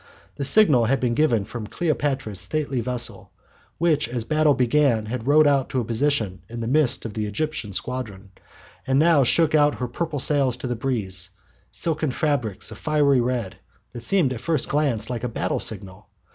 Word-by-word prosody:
The 140 - -2
signal 140 - +5
had 135 +4 +1
been 120 -2 0
given 120 -7 +2
from 110 0 -7
Cleopatra's 135 - -2
stately 135 +5 -2
vessel, 125 0 -5 0.5
which 155 -8 +1
as 120 -2 -2
the 155 - -3
battle 155 -2 +4
began 125 -3 +2
had 120 +2 -5
rowed 150 +2 +5
out 140 -2 +2
to 130 - -1
a 120 - -2
position 115 -5 -1
in 120 +1 -7
the 115 - -3
midst 135 -2 +2
of 110 - -5
the 105 0 -3
Egyptian 135 0 -3
squadron, 100 -3 -5 0.6
and 135 0 +2
now 155 -1 +5
shook 155 +5 +3
out 150 -1 +4
her 125 - -3
purple 155 +5 -4
sails 135 -3 +1
to 125 - -7
the 125 -1 -2
breeze, 100 -7 -2 0.4
silken 155 -3 -1
fabrics 125 -8 -1
of - - -10
fiery 145 -4 +2
red, 120 -5 -2 0.3
that 120 - -8
seemed 170 -4 +1
at 120 - -7
first 155 0 0
glance 135 -7 0
like 120 -1 -4
a 125 - -1
battle 110 - -2
signal. 95 +1 -7
130 Hz, 185 wpm, -23 LUFS, 115-150 Hz, 0.6 s, signal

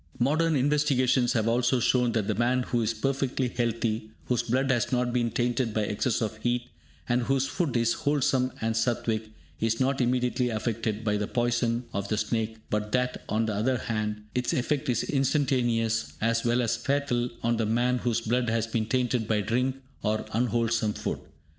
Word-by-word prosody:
Modern 155 +6 +2
investigations 130 -3 +2
have 110 -2 +1
also 120 +2 +2
shown 120 0 +2
that 110 -3 0
the 110 - +1
man 120 +4 +1
who 120 -1 0
is 110 0 +1
perfectly 135 +2 -1
healthy, 115 -2 -1 0.2
whose 125 -2 +1
blood 130 +3 +1
has 120 -3 0
not 125 -1 +1
been 120 -2 +1
tainted 120 -1 0
by 110 - +2
excess 105 +3 0
of 110 0 -3
heat, 120 +2 -1 0.4
and 120 0 +2
whose 135 +2 +1
food 135 -1 -1
is 115 0 +2
wholesome 135 -3 +1
and 110 0 0
Satvic, 110 -1 0 0.3
is 115 0 0
not 135 +1 +1
immediately 125 0 +1
affected 110 -1 -2
by 105 -2 +1
the 105 0 -2
poison 120 0 0
of 100 0 -2
the 110 - -1
snake, 110 0 -1
but 105 0 -1
that, 125 0 0
on 110 +1 +1
the 110 - -1
other 120 +5 +1
hand, 105 -2 -3
its 125 0 0
effect 130 +2 0
is 125 - +1
instantaneous 125 -5 +1
as 115 +1 +1
well 120 +1 +2
as 115 0 0
fatal 125 -1 0
on 115 0 +2
the 110 -1 0
man 120 +3 +1
whose 120 -1 0
blood 120 +1 0
has 115 0 +1
been 115 -1 -2
tainted 125 -2 0
by 110 -1 +2
drink 125 +6 0 0.3
or 110 0 0
unwholesome 115 -2 +1
food. - - -3
120 Hz, 185 wpm, -27 LUFS, 110-125 Hz, 0.4 s, Modern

